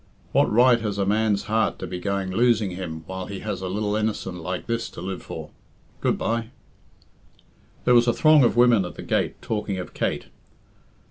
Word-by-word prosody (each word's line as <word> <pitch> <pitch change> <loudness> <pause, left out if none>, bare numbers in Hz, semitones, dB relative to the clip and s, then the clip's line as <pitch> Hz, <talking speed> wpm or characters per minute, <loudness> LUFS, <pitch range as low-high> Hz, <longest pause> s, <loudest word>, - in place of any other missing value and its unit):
"What - - +3
right 120 +2 +5
has 105 -3 -2
a 100 - +1
man's 105 0 +1
heart 110 0 0
to - - -6
be 90 - -5
going 100 0 -2
losing 110 -1 +2
him 85 -3 -6
while 95 +1 -6
he 100 -1 -6
has 105 -4 -4
a 95 - -3
lil 105 +2 -1
innocent 105 -5 -2
like 90 +2 -4
this 115 0 -2
to - - -11
live 95 +1 -5
for? - - -8 0.5
Good - - +1
bye!" 115 0 -1 1.4
There 125 - +5
was 120 0 +5
a 120 - +4
throng 155 -3 +5
of 120 - +2
women 120 -4 +5
at 90 - -7
the - - -8
gate - - -1
talking 105 -3 -2
of 90 - -6
Kate. - - -2
105 Hz, 195 wpm, -24 LUFS, 95-115 Hz, 1.4 s, right